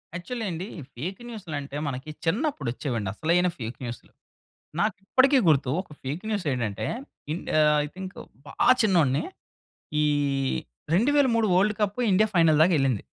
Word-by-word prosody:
Actually 225 +7 -4
అండి. 175 +4 -5 0.3
Fake 180 - -5
న్యూసులంటే 150 -11 -6
మనకి 135 +2 -5 0.2
చిన్నప్పుడొచ్చేవండి 140 - -1
అసలైన 175 +5 +2
ఫేక్ 115 -1 -6
న్యూసులు. 120 -1 -7 0.7
నాకిప్పటికీ 220 +8 +3
గుర్తు 140 -4 +3
ఒక 190 - -19
ఫేక్ 145 +8 -4
న్యూసేంటంటే, 130 - -1 0.4
ఇన్ 165 - -3 0.2
ఆహ్, 150 0 +5
ఐ - - -6
థింక్ 190 0 -7 0.3
బా - - -10 0.3
చిన్నోడిని. 165 - +3 0.8
ఈ - - +3 0.9
2003 235 +1 +3
వోల్డ్ 200 +4 +3
కప్పు 205 +3 0
ఇండియా 210 +3 +4
ఫైనల్‌దాకెళ్ళింది. 155 - +4
170 Hz, 120 wpm, -26 LUFS, 140-205 Hz, 0.9 s, ఆహ్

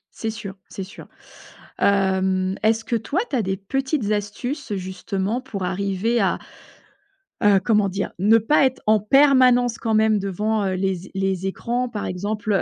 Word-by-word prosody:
C'est 225 - -3
sûr, 205 -3 -8
c'est 195 - -6
sûr, 190 - -12 0.7
hem, 190 -1 +1
est-ce 225 +1 +2
que 230 +1 -2
toi 230 - -1
tu - - -2
as 245 - +2
des 190 -1 -2
petites 265 +2 -2
astuces 210 +5 -3
justement 190 +3 -3
pour 255 -7 -6
arriver 195 +5 0
à 195 - +1 1.0
heu, 205 -2 +5
comment 210 -2 +3
dire? 195 +1 -3
Ne 210 +4 +5
pas 270 +6 +3
être 260 -1 -1
en 215 0 +4
permanence 250 0 +4
quand 225 -1 -2
même 215 -1 +3
devant, 205 +2 -1
heu, 190 - 0
les 190 -1 -2
é - - -17
les 190 -1 -1
écrans, 240 +6 -2
par 220 -4 -5
exemple, 210 +4 -3
heu, 195 - +3
210 Hz, 170 wpm, -22 LUFS, 195-230 Hz, 1.0 s, heu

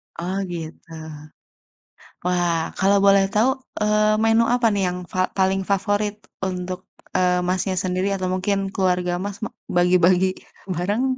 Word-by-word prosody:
Oh 180 +3 -3
gitu. 165 0 -8 1.3
Wah, 175 -1 +1 0.2
kalau 200 +1 +4
boleh 195 0 +6
tahu, 225 +5 +4 0.3
eee, 215 0 +3
menu 225 +1 +4
apa 245 -1 0
nih 200 - 0
yang 180 0 -2
fa 185 - -3
yang - - -15
paling 190 0 +2
favorit 205 +1 0 0.3
untuk, 180 0 -3 0.4
eee, 180 -1 +3
Masnya 185 +1 0
sendiri 185 +1 0
atau 185 -1 -2
mungkin 195 +2 0 0.2
keluarga 180 -2 +1
Mas, 200 -1 -5
ma - - -2 0.3
bagi 180 +1 +4
bagi 185 +1 +4 0.5
bareng? 205 +8 0
190 Hz, 145 wpm, -22 LUFS, 180-205 Hz, 1.3 s, boleh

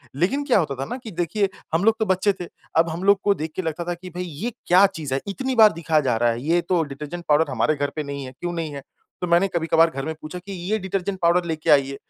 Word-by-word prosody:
लेकिन 240 - +1
क्या 260 -6 +4
होता 150 -5 -1
था 135 +1 -4
ना 245 - -5
कि 220 - -7
देखिए 185 +3 0 0.2
हम 165 +3 +2
लोग 225 0 +5
तो 220 - +1
बच्चे 190 +1 +2
थे। 175 - -5 0.3
अब 165 +1 +4
हम 170 +4 -5
लोग 200 0 +5
को 205 - +4
देख 155 -2 -5
के - - -1
लगता 165 0 -3
था 175 - -1
कि 180 +1 -10
भई 180 - -2
ये 180 +8 -5 0.2
क्या 185 +3 +7
चीज़ 160 -8 -5
है? 135 - +1
इतनी 260 +6 -2
बार 220 -2 +8
दिखाया 160 -1 +1
जा 125 -5 +1
रहा 120 +1 +3
है 115 +1 -2
ये 170 +2 +3
तो 170 -1 +1
डिटर्जेंट 150 +4 -7
पाउडर 150 0 +3
हमारे 155 - +1
घर 145 0 -1
पे 155 - -2
नहीं 140 -1 -5
है। 130 - -8
क्यों 175 0 -3
नहीं 160 -3 -4
है? 140 - -6 0.4
तो 180 - -1
मैंने 170 +3 +4
कभी-कभार 165 0 +4
घर 135 -3 -5
में 160 - -2
पूछा 155 +4 -7
कि 190 +3 -10 0.2
ये 220 - +3
डिटर्जेंट 190 0 -3
पाउडर 170 +1 +3
लेके 160 0 -3
आइए। 140 -2 +4
170 Hz, 280 wpm, -23 LUFS, 150-190 Hz, 0.4 s, बार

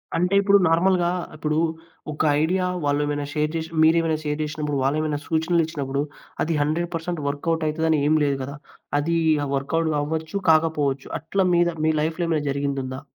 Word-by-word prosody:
అంటే 180 +3 +1
ఇప్పుడు 200 0 +5
నార్మల్‌గా 175 +1 +3 0.3
ఇప్పుడు 155 0 -1 0.5
ఒక 150 - -4 0.2
ఐడియా 180 +3 +1 0.2
వాళ్ళు 145 +1 +1
ఏమైనా 145 0 -2
షేర్ 150 0 0
చేసి 160 0 -3
మీరేమైనా 160 -1 +3
షేర్ 150 0 -2
చేశినప్పుడు 150 -1 -3
వాళ్లేమైనా 150 +1 0
సూచనలిచ్చినప్పుడు 160 -4 0 0.4
అది 165 - -1
100% 165 +4 0
పర్సెంట్ 165 0 -3
వర్క్‌‌ఔట్ 160 +3 -1
అయితదనేం 155 -1 +2
లేదు 140 -1 +1
గదా! 140 +2 -6 0.4
అది 165 +3 0 0.3
ఆహ్, 140 - -5
వర్క్‌‌ఔట్ 160 +4 0
అవ్వచ్చు 160 +5 -3
కాకపోవచ్చు. 150 -4 +2
అట్లా 190 +4 0
మీద 175 0 +3 0.2
మీ 160 - +4
లైఫ్‌లేమైనా 160 -1 -1
జరిగిందుందా? 135 -1 -3
155 Hz, 145 wpm, -23 LUFS, 145-165 Hz, 0.5 s, ఇప్పుడు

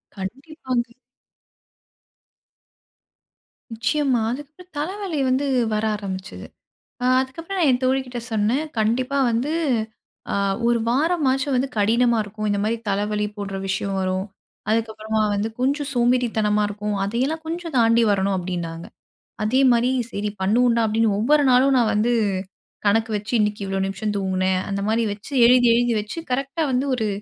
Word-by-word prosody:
கண்டிப்பாங்க. 255 - -4 2.8
நிச்சயமா. 255 +2 +1
அதுக்கப்புறம் 305 +7 -9
தலைவலி 365 +1 -3
வந்து 260 +3 +1 0.3
வர 215 0 0
ஆரம்பிச்சது. 190 -2 -6 0.6
அ - - +1 0.2
அதுக்கப்புறம் 330 +9 -6
நான் 320 -5 +4
என் 250 0 0
தோழிகிட்ட 255 -1 0
சொன்னேன். 220 +7 +1 0.2
"கண்டிப்பா 250 +5 0
வந்து 240 +6 -1 0.8
அ - - 0 0.3
ஒரு 235 0 +3
வாரமாச்சும் 280 -1 +1
வந்து 255 +2 +1
கடினமா 235 +3 +3
இருக்கும். 215 +1 -5
இந்தமாரி 205 +3 0
தலைவலி 210 +1 0
போன்ற 200 -1 -5
விஷயம் 195 0 -2
வரும். 185 0 -1 0.5
அதுக்கப்புறமா 220 -1 -1
வந்து 205 +2 -1
கொஞ்சம் 280 +3 0
சோம்பேறித்தனமா 235 -4 +2
இருக்கும். 210 0 -3
அதையெல்லாம் 265 +10 -1
கொஞ்சம் 335 -2 -5
தாண்டி 230 0 +4
வரணும்." 195 0 +1
அப்பிடின்னாங்க. 170 -2 -4 0.6
அதேமாரி 250 +1 +3 0.2
"சரி 205 +1 -2
பண்ணுவோண்டா!" 235 +4 +3
அப்பிடின்னு 220 0 +2
ஒவ்வொரு 290 +7 +3
நாளும் 265 +2 +4
நான் 235 -3 +3
வந்து 225 +3 +2 0.7
கணக்கு 220 +3 +2
வச்சு 210 +3 -7
இன்னக்கி 210 0 0
இவ்ளோ 195 0 -2
நிமிஷம் 205 +2 -3
தூங்கினேன். 185 -1 0
அந்தமாரி 205 +3 0
வச்சு 210 +7 -11
எழுதி, 245 0 +6
எழுதி 240 0 +2
வச்சு 210 +10 -5
கரெக்ட்டா 275 +5 -1
வந்து 255 +2 +1
ஒரு 220 -3 -1
230 Hz, 130 wpm, -22 LUFS, 210-265 Hz, 2.8 s, எழுதி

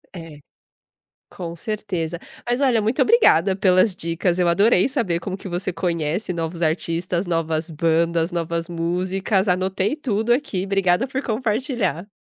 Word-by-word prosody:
É, 165 -4 -9 0.9
com 170 -2 -7
certeza, 180 -5 -3 0.3
mas 245 +3 0
olha, 245 -5 +3
muito 220 +4 0
obrigada 195 - +4
pelas 185 0 +3
dicas, 170 +1 -1
eu 180 - +3
adorei 190 +4 +4
saber 230 - -1
como 190 +2 -4
que - - -9
você 180 +2 -2
conhece 170 +2 -2
novos 165 0 -4
artistas, 170 +2 -1
novas 165 -1 -1
bandas, 165 +2 +1
novas 170 0 -2
músicas, 185 +4 -1
anotei 190 +6 0
tudo 235 -6 -1
aqui, 245 -8 -2
obrigada 195 +3 +1
por 265 +1 -3
compartilhar. 225 - -1
185 Hz, 140 wpm, -22 LUFS, 170-215 Hz, 0.9 s, obrigada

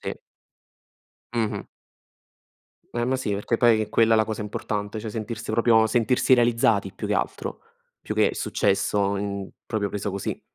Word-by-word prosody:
Sì. - - -5 1.2
Mh-mh. 115 -3 -1 1.3
Eh, 120 0 -1
ma 130 +2 +1
sì 105 -5 -2
perché 105 +4 0
poi 115 -2 +4
è 105 - -4
quella 115 0 +4
la 110 0 +3
cosa 110 -1 -4
importante, 105 0 -4
cioè 110 0 -5
sentirsi 110 0 -5
proprio 115 0 +4
sentirsi 120 +3 +3
realizzati 115 -5 +3
più - - -6
che - - 0
altro, - - -2 0.4
più - - -5
che - - +3
successo 100 -1 +1
in 100 -1 -3 0.2
proprio 105 -3 -1
preso 105 +1 -3
così. 100 0 -4
110 Hz, 155 wpm, -25 LUFS, 105-115 Hz, 1.3 s, poi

